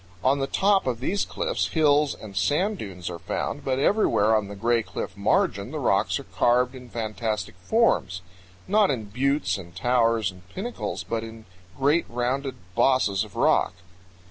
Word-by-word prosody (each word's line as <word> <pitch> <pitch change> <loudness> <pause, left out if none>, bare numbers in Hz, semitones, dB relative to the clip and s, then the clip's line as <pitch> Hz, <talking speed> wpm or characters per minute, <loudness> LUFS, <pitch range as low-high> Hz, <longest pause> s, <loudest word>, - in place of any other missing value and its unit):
On 140 +2 +3
the 135 - -1
top 195 +1 +2
of 120 -3 -1
these 195 +10 -1
cliffs - - -1
hills 150 -2 +3
and 105 -3 -11
sand 155 - +1
dunes 90 -4 -7
are 85 -1 -5
found, - - -3
but 130 -1 0
everywhere 135 - +3
on 105 -2 0
the 100 - -8
Gray 115 +3 +2
Cliff - - -6
margin - - +1
the - - -5
rocks - - +1
are - - -8
carved 125 +1 +2
in 125 -2 -11
fantastic 110 -3 -3
forms; 95 - +1 0.4
not 205 +1 +4
in 110 -6 -3
buttes 130 -5 0
and 85 -2 -12
towers 115 -1 +2
and 90 0 -16
pinnacles, 235 +6 -4
but 115 -1 -3
in 115 -1 -10 0.3
great 145 +5 +2
rounded 130 +3 -2 0.2
bosses 110 -5 +2
of - - -12
rock. 90 - +2
120 Hz, 170 wpm, -25 LUFS, 105-140 Hz, 0.4 s, not